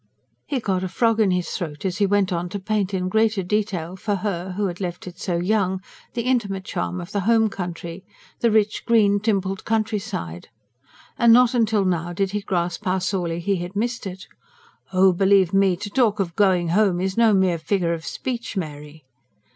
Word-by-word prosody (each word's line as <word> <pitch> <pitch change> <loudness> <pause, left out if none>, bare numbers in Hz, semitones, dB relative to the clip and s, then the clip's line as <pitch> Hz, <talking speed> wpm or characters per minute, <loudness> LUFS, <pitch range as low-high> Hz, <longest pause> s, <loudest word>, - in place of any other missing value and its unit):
He 280 -3 -1
got 190 -5 -1
a - - -1
frog 225 +4 +1
in 210 -3 +4
his 180 -1 -1
throat 150 -3 -5
as 190 +1 -2
he 200 - +3
went 200 -1 +2
on 175 +1 -2
to 200 +2 -4
paint 205 0 -1
in 185 -2 -1
greater 220 0 +2
detail 185 -3 -2
for 205 +2 -2
her, 185 -2 -3
who 205 +2 -1
had 180 0 -4
left 175 -2 -4
it 180 -1 -10
so 175 -3 -1
young, 190 +1 +1 0.4
the 235 - -1
intimate 205 -7 0
charm 180 0 -3
of 175 +2 -8
the 205 - -1
home 220 +2 +3
country 175 -1 -6 0.4
the 235 - +3
rich, 215 -1 +1
green, 210 -4 +4
dimpled 195 -3 -1
countryside. 210 - -3 0.7
And 235 -2 +6
not 245 +1 +6
till 210 -2 +1
now 175 -1 -1
did 195 +2 -1
he 210 0 -2
grasp 175 -1 -2
how 185 0 +1
sorely 180 -3 -2
he 195 +3 0
had 175 +2 -6
missed 235 +1 -2
it. 185 0 -8 0.7
"Oh, 185 0 +5
believe 190 0 +3
me, 195 -2 +4
to 205 +3 -6
talk 225 -5 +2
of 175 -4 -2
'going 185 -4 +3
home' 190 0 +2
is 190 +1 -1
no 230 -1 +5
mere 185 -3 +2
figure 170 0 0
of 165 -1 -5
speech, 235 -1 -4
Mary!" 150 -3 -6
190 Hz, 195 wpm, -23 LUFS, 175-210 Hz, 0.7 s, And